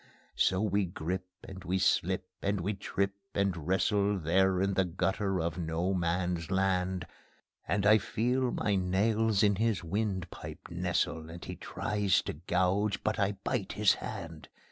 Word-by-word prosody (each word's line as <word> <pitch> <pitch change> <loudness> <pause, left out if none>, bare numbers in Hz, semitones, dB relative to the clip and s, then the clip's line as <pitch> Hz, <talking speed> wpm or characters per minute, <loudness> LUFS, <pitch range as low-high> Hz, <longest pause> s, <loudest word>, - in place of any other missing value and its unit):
So 95 +1 +2
we 100 -1 +2
grip 90 +2 -4 0.2
and 95 -1 -9
we 90 +2 0
slip 95 0 +1
and 100 0 0
we 100 +5 -1
trip 100 0 -1 0.2
and 95 -6 0
wrestle 100 +2 +2
There 95 +3 +2
in 100 +1 +1
the 95 - +3
gutter 95 +2 -1
of 85 +1 -2
No 85 +3 -1
Man's 90 -1 -1
Land; 95 -1 +1 0.6
And 100 +2 +1
I 110 +1 +7
feel 125 +6 0
my 105 -3 0
nails 100 +3 +2
in 100 -2 +4
his 110 -5 +1
wind 95 -1 -2
pipe - - -9
nestle, 80 0 -1
And 85 +1 -8
he - - -5
tries 105 -3 0
to - - -4
gouge, 95 +5 0
but 110 +1 0
I 100 0 +2
bite 120 -7 -1
his 105 -1 +4
hand. 80 -2 -7
95 Hz, 160 wpm, -31 LUFS, 90-100 Hz, 0.6 s, I